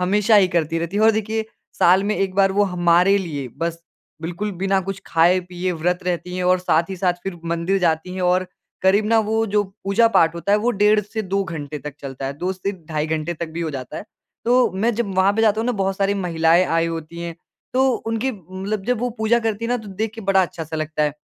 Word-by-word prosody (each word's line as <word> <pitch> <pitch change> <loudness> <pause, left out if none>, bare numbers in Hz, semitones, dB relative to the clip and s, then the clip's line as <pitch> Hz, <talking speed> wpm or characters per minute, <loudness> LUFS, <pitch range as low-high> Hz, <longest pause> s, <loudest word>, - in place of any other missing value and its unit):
हमेशा 205 +4 +3
ही 195 -3 +5
करती 165 -2 0
रहती 170 +4 -3
है 210 - +2
और 220 - +7
देखिए 220 0 -1 0.3
साल 185 +3 +5
में 210 +1 0
1 195 -1 -1
बार 195 0 +3
वो 205 +1 +3
हमारे 175 +2 +4
लिए 145 -8 -4
बस, 165 0 -3 0.4
बिल्कुल 175 +6 -3
बिना 195 0 +2
कुछ 195 +1 -5
खाए 170 +3 +3
पिए 180 0 -4
व्रत 180 +1 0
रहती 180 0 -3
हैं 180 - -2
और 185 0 +4
साथ 170 -1 +1
ही 190 - -4
साथ 180 0 +2
फिर 195 -3 -5
मंदिर 170 +3 0
जाती 170 0 0
हैं 185 - -4
और 180 +1 +2 0.4
करीब 195 +3 +4
ना 225 0 +4
वो 220 +1 +1
जो 210 0 +2 0.2
पूजा-पाठ 195 -5 +3
होता 170 +4 -1
है 210 - +5
वो 235 +3 +1
डेढ़ 210 -1 +3
से 210 +2 -5
2 195 0 -1
घंटे 150 -4 -6
तक 150 -1 -8
चलता 135 -1 -6
है, 135 - -3
2 180 +6 -3
से 190 +1 -3
ढाई 155 -1 -2
घंटे 160 +2 -2
तक 170 +1 -4
भी 165 +2 -5
हो 165 -2 -2
जाता 135 +1 -6
है। - - -6 0.4
तो 250 +2 +4
मैं 215 +6 +1
जब 210 -4 -2
वहाँ 190 +1 +4
पे 225 +2 0
जाता 215 -1 +3
हूँ 230 - -2
ना 250 - +1
बहुत 195 -3 -1
सारी 200 0 +1
महिलाएँ 170 -2 +3
आई 165 -1 +1
होती 165 0 -6
हैं। 170 -1 -5 0.4
तो 265 +1 +3 0.2
उनकी 225 +3 0
मतलब 190 +1 -5
जब 250 -1 +1
वो 245 - 0
पूजा 220 +2 +3
करती 220 0 -2
हैं 230 - -2
ना 245 - +2
तो - - -9
देख 210 +3 -3
के 225 - -8
बड़ा 195 -2 +3
अच्छा 170 -2 -4
सा 160 +1 -6
लगता 155 0 -2
है। 150 -1 +1
185 Hz, 245 wpm, -21 LUFS, 170-205 Hz, 0.4 s, और